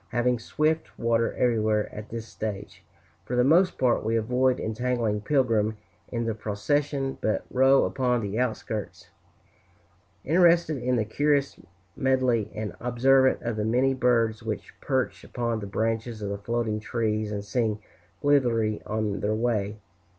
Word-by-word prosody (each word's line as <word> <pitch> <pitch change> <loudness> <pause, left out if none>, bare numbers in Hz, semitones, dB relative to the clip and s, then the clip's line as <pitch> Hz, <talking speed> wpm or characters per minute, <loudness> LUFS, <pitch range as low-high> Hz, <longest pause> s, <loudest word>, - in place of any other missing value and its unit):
Having 120 0 +1
swift 155 +7 -1
water 115 -1 +1
everywhere 110 -3 +1
at 105 0 -8
this 115 -1 -5
stage, 100 -4 -6 0.4
for 120 +5 -4
the 125 - +4
most 170 +8 +4
part 125 -2 +2
we 115 +1 0
avoid 125 +3 +1
entangling 115 -2 -1
Pilgrim 110 -4 +1 0.3
in 115 -1 -3
the 115 - -1
procession, 135 +6 -1
but 110 - 0
row 135 +1 +5
upon 125 -3 0
the 105 +2 -3
outskirts, 105 -7 -3 1.2
interested 170 -1 +4
in 125 +1 +1
the 110 -3 +1
curious 140 +4 0 0.4
medley, 130 -5 +1
and 105 -1 -4
observant 130 +2 +3
of 115 -2 -2
the 105 - -1
many 125 +5 +2
birds 115 -4 +1
which 110 -2 -5
perch 130 -2 -1
upon 115 -2 -2
the 100 - -6
branches 110 +1 -2
of 100 - -3
the 100 - -3
floating 115 0 -1
trees 110 -1 -1
and 100 -1 -4
sing 110 -1 0 0.5
blithely 120 -7 +2
on 105 -2 -1
their 105 +1 0
way. 110 -3 -1
115 Hz, 145 wpm, -26 LUFS, 110-130 Hz, 1.2 s, row